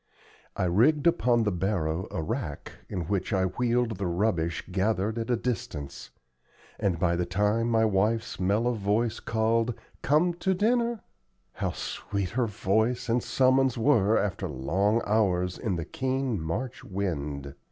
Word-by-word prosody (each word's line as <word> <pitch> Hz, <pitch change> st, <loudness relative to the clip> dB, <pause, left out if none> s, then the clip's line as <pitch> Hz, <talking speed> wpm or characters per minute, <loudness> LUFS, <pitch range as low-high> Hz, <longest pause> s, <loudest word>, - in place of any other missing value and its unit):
I 95 Hz, -, -1 dB
rigged 120 Hz, -, +3 dB
upon 125 Hz, -8 st, +3 dB
the 105 Hz, -, +1 dB
barrow 90 Hz, -2 st, -1 dB
a 80 Hz, -, -3 dB
rack, 100 Hz, -, -4 dB, 0.2 s
in 95 Hz, -4 st, -3 dB
which 95 Hz, +4 st, -2 dB
I 95 Hz, -2 st, +2 dB
wheeled 120 Hz, +2 st, 0 dB
the 100 Hz, -, -1 dB
rubbish 85 Hz, -2 st, 0 dB
gathered 105 Hz, +3 st, 0 dB
at 115 Hz, +1 st, -4 dB
a 120 Hz, -, +3 dB
distance; 75 Hz, -, -4 dB, 0.7 s
and 95 Hz, -4 st, +1 dB
by 85 Hz, +1 st, +1 dB
the 90 Hz, 0 st, -1 dB
time 105 Hz, +4 st, +1 dB
my 110 Hz, -1 st, +3 dB
wife's 110 Hz, +2 st, 0 dB
mellow 105 Hz, +6 st, +1 dB
voice 110 Hz, +2 st, 0 dB
called, 115 Hz, +1 st, 0 dB, 0.3 s
"Come 155 Hz, +6 st, +3 dB
to 190 Hz, -1 st, +1 dB
dinner" 235 Hz, +2 st, +1 dB, 0.5 s
how -, -, -2 dB
sweet 100 Hz, -2 st, -3 dB
her 120 Hz, 0 st, +1 dB
voice 110 Hz, +4 st, 0 dB
and 120 Hz, +2 st, +2 dB
summons 130 Hz, 0 st, +2 dB
were 115 Hz, -4 st, +3 dB
after 100 Hz, -1 st, -1 dB
long 95 Hz, -, +1 dB
hours 90 Hz, -4 st, +1 dB
in 100 Hz, -5 st, -1 dB
the 85 Hz, -2 st, -3 dB
keen 130 Hz, -3 st, -2 dB
March 115 Hz, +11 st, -4 dB
wind! 75 Hz, -8 st, -3 dB
105 Hz, 150 wpm, -27 LUFS, 90-120 Hz, 0.7 s, rigged